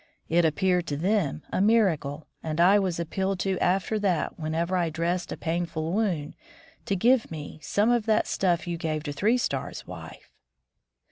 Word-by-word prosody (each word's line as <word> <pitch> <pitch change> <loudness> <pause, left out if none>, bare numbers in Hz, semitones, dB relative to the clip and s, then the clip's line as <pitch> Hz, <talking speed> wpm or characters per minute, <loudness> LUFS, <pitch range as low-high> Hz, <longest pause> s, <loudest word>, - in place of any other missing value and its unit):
It 170 +1 +4
appeared 180 +2 +1
to 145 - -2
them 175 -3 0
a - - +1
miracle, 165 -9 +2 0.2
and 155 0 -3
I 190 +4 +6
was 185 -4 -1
appealed 190 +3 -1
to 190 0 0
after 195 +4 +1
that 185 -6 0
whenever 165 +3 -1
I 175 -2 +1
dressed 170 +3 -2
a - - -4
painful 165 -1 -2
wound, 185 -9 -1 0.5
to 200 - +1
"give 240 +5 +3
me 155 -1 -7
some 210 +8 +2
of 235 -2 +1
that 220 - +3
stuff 175 -4 0
you 175 -1 -3
gave 155 -2 -2
to 145 -2 -4
Three 210 - +2
Stars' 245 - -3
wife." - - -10
175 Hz, 175 wpm, -27 LUFS, 160-195 Hz, 0.5 s, I